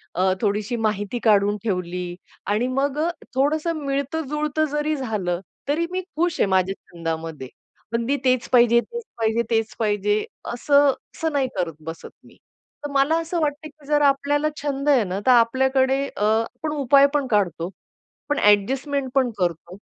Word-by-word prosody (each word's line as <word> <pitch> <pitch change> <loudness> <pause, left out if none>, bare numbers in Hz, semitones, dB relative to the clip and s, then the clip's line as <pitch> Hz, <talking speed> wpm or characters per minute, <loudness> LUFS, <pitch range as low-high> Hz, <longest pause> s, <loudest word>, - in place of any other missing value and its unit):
अ, 185 +1 +2
थोडीशी 210 +2 0
माहिती 215 +1 -1
काढून 205 -1 +4
ठेवली 180 -3 -3 0.3
आणि 215 +5 +1
मग 270 +2 -1
अ, 330 +2 +1 0.3
थोडसं 305 +5 +1
मिळतं-जुळतं 300 +2 -1
जरी 295 +1 0
झालं, 200 -9 -2 0.3
तरी 330 +4 +1
मी 370 - -1 0.2
खुश 345 -1 0
आहे - - +4
माझ्या 190 0 +2 0.2
छंदामध्ये. 165 -4 -5 0.4
पण 230 0 0
मी 280 +3 +1
तेच 255 -1 +2
पाहिजे, 235 -1 +6
तेच 475 - -7
पाहिजे, 225 +1 +1
तेच 225 -1 +1
पाहिजे. 210 -1 +1 0.3
असं, 280 +3 +4 0.2
असं 320 -1 -1
नाही 270 -2 +1
करत 170 -3 -1
बसत 165 0 -7 0.2
मी. - - -18 0.5
तर 290 - -4
मला 280 +4 +3
असं 335 +1 -3
वाटतं 295 +1 -2
की 300 -1 -21
जर 295 -1 +2
आपल्याला 285 +2 +2
छंद 285 0 -1
आहे 260 -6 +5
ना, 185 +1 -3
तर - - +7
आपल्याकडे 260 +3 +3 0.2
अ, 205 - -1
आपण 225 +8 0
उपाय 280 +1 +5
पण 285 -3 +1
काढतो. 175 -4 +1 0.6
पण 290 - +1
अ‍ॅडजस्टमेंट 260 +7 +2
पण 260 -2 +3
करतो. 175 0 -2
255 Hz, 160 wpm, -23 LUFS, 205-290 Hz, 0.6 s, तर